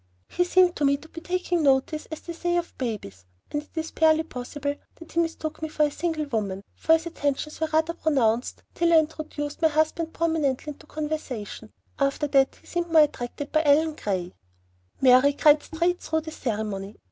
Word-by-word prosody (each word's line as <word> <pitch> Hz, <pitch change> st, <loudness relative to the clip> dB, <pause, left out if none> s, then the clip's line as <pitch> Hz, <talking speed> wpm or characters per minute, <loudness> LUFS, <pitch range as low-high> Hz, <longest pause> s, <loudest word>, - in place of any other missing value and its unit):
He 355 Hz, -, +1 dB
seemed 360 Hz, 0 st, +4 dB
to 295 Hz, -, -1 dB
me 280 Hz, 0 st, +4 dB
to 310 Hz, -, -15 dB
be 330 Hz, -, -9 dB
"taking 360 Hz, 0 st, -1 dB
notice," 280 Hz, +2 st, +2 dB
as 315 Hz, -, -7 dB
they 340 Hz, -, -7 dB
say 345 Hz, +1 st, -1 dB
of 345 Hz, 0 st, -3 dB
babies, 205 Hz, -, -4 dB, 0.3 s
and 295 Hz, -, -1 dB
it 300 Hz, -, -21 dB
is 320 Hz, 0 st, -3 dB
barely 320 Hz, 0 st, +4 dB
possible 285 Hz, +1 st, -4 dB, 0.2 s
that 330 Hz, -, -13 dB
he 335 Hz, -, 0 dB
mistook 320 Hz, -2 st, -2 dB
me 315 Hz, -, -3 dB
for 305 Hz, -, +1 dB
a 295 Hz, -, +2 dB
single 315 Hz, 0 st, -2 dB
woman, 205 Hz, -7 st, -3 dB
for 320 Hz, -, +2 dB
his 325 Hz, +1 st, +2 dB
attentions 300 Hz, -2 st, -2 dB
were 320 Hz, -, +1 dB
rather 315 Hz, +1 st, +2 dB
pronounced 255 Hz, -8 st, 0 dB
till 340 Hz, 0 st, +2 dB
I -, -, +8 dB
introduced 305 Hz, -1 st, -2 dB
my 320 Hz, -, +6 dB
husband 315 Hz, +1 st, 0 dB
prominently 310 Hz, -4 st, 0 dB
into 305 Hz, -, -19 dB
conversation; 275 Hz, -9 st, -5 dB, 0.3 s
after 275 Hz, +2 st, +1 dB
that 270 Hz, -1 st, +3 dB
he -, -, -24 dB
seemed 345 Hz, -1 st, -3 dB
more 320 Hz, -2 st, +8 dB
attracted 285 Hz, 0 st, -4 dB
by 310 Hz, -, +3 dB
Ellen 310 Hz, +2 st, +4 dB
Gray. 185 Hz, -, -3 dB, 0.7 s
Mary 260 Hz, +2 st, +6 dB
cried 295 Hz, +1 st, +5 dB
straight 340 Hz, +2 st, -1 dB
through 320 Hz, 0 st, -1 dB
the 315 Hz, 0 st, -8 dB
ceremony. 210 Hz, -6 st, -4 dB
305 Hz, 195 wpm, -25 LUFS, 270-320 Hz, 0.7 s, I